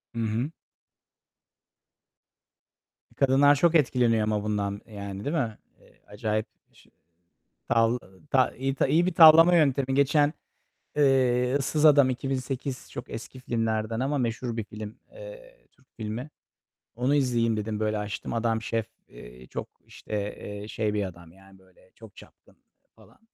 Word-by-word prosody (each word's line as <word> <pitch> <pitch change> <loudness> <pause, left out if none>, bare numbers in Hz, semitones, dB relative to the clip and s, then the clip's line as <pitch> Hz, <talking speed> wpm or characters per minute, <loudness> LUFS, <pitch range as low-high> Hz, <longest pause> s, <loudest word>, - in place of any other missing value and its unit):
Hı - - -3
hı. 115 +6 -1 2.6
I - - -25
kadınlar 140 +1 +4
çok 170 +4 +2
etkileniyor 120 -6 +3
ama 105 -1 -1
bundan, 100 -1 -2
eee, 110 - -17
yani, 100 0 -7
değil 150 +4 -1
mi? 115 -8 -2 0.2
Eee, - - -25
acayip 110 +1 -2 0.3
şe - - -22 0.8
tavla 115 0 +2 0.3
ta 130 -1 +3
iyi 135 +1 -3
iyi 160 +5 +3
bir 185 - -1
tavlama 165 0 +8
yöntemi. 135 -4 +2
Geçen, 145 +1 +3 0.6
eee, 130 -2 +3
Issız 150 +2 -1
Adam, 140 -3 +6
2008 130 +1 -4
çok 120 - -8
eski 125 +3 -8
filmlerden 115 -2 -2
ama 140 +2 0
meşhur 120 -1 -2
bir 110 - -3
film, 105 0 -9
eee, - - -13
Türk 130 - -30
filmi. 115 +6 -5 0.7
Onu 125 +5 +1
izleyeyim 120 -5 +1
dedim. 105 0 -3
Böyle 110 0 0
açtım. 105 +2 -5
Adam 115 -1 0
şef, 115 -1 -2 0.2
eee, 60 +1 -13
çok, - - -6 0.2
işte, - - -11 0.2
eee, 105 0 -8
şey 110 -1 -2
bir 105 -1 0
adam. 85 -3 -9
Yani, 95 0 -19
böyle 95 0 -25
çok 110 -3 -15
çapkın - - -18 0.4
falan. - - -21
120 Hz, 145 wpm, -26 LUFS, 105-140 Hz, 2.6 s, tavlama